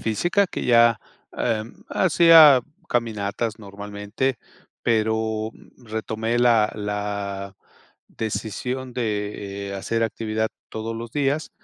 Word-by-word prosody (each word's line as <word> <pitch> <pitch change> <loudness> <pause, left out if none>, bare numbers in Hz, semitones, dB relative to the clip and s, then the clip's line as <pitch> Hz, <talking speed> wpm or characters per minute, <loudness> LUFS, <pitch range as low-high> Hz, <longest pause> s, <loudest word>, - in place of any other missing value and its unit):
física, 175 - +1
que - - -5
ya, 115 -2 +5 0.4
em, 115 -1 -2
hacía 165 -6 +7 0.3
caminatas 110 -1 -2
normalmente, 105 +4 -4 0.4
pero 110 -1 0 0.3
retomé 110 +1 -3
la 115 -3 +4
la 100 -1 -4 0.5
decisión 115 +4 -4
de 105 -3 -3
hacer 115 +4 -1
actividad 110 0 -1 0.2
todos 110 +1 -4
los 115 0 -6
días, 145 +2 0
110 Hz, 95 wpm, -23 LUFS, 105-120 Hz, 0.5 s, hacía